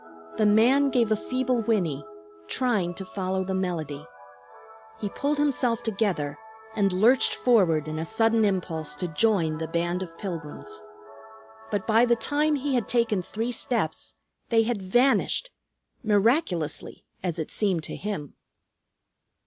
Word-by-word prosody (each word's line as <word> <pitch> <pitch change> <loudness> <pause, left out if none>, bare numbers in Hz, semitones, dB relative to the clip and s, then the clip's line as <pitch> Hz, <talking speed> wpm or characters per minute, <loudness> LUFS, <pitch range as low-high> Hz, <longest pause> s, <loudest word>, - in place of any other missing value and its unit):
The 215 - +3
man 250 +7 +4
gave 235 -4 +1
a - - +5
feeble 255 +1 -1
whinny, 195 -11 0 0.4
trying 200 - 0
to 190 - -6
follow 190 -2 -2
the 190 +1 -3
melody. 170 -6 -3 1.0
He 205 - -3
pulled 290 +7 -1
himself 255 -5 +1
together 195 -10 -1 0.4
and 200 -3 +2
lurched 220 +8 +4
forward 180 -11 +3
in 155 0 -4
a - - -2
sudden 225 +3 +2
impulse 170 -7 -1
to 180 +4 -3
join 165 -2 +1
the 160 - -3
band 175 +2 -1
of 165 -3 -7
pilgrims. 150 - -7 0.9
But 205 -3 -2
by 225 +2 +4
the 240 -1 +3
time 295 +6 +1
he 280 0 -2
had 245 -3 0
taken 230 -5 +1
three 225 +6 -3
steps 160 - -2 0.3
they 225 -1 +4
had 225 -3 -2
vanished, 255 - +2 0.5
miraculously, 205 - 0 0.2
as 175 -3 -2
it 160 - -4
seemed 190 -6 0
to - - -5
him. 195 -9 -5
205 Hz, 140 wpm, -26 LUFS, 170-235 Hz, 1.0 s, a